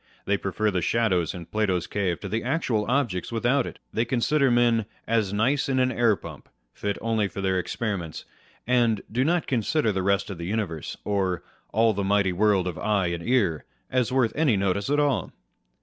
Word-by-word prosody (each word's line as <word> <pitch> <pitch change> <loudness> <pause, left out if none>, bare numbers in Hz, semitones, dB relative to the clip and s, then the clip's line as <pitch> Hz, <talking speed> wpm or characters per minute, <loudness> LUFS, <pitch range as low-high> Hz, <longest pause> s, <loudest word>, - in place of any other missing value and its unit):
They 100 - +2
prefer 100 +2 -1
the 90 -2 0
shadows 95 -4 +1
in 85 -2 -7
Plato's 95 -4 0
cave 95 -5 -1
to - - -5
the 110 +1 -2
actual 125 -6 0
objects 120 -10 0
without 120 +4 +1
it. - - -8 0.2
They 115 - +1
consider 130 +4 +2
men 120 -3 +3
" - - -36
as 105 -4 0
nice 130 +8 +1
in 130 - +1
an 130 0 +3
air 120 -4 +3
pump," - - -11 0.2
fit 100 -1 -3
only 110 -2 +1
for 100 - -8
their 95 -1 +1
experiments; 90 -5 -4 0.4
and 120 -4 +2
do 125 +4 +1
not 170 +3 +1
consider 125 0 +1
the 95 -1 -1
rest 100 0 +1
of 90 - -7
the 85 - -4
universe, 95 -7 -3
or 95 -3 0
" - - -39
all 115 +1 +3
the 100 0 -2
mighty 100 -1 +2
world 100 -1 +3
of 90 -2 -4
eye 100 -4 +1
and 85 -1 -3
ear," 100 - +1 0.3
as 125 -2 +1
worth 125 -4 +2
any 145 -9 +3
notice 100 +2 0
at 145 +1 +2
all. 145 -3 0
105 Hz, 200 wpm, -25 LUFS, 95-120 Hz, 0.4 s, men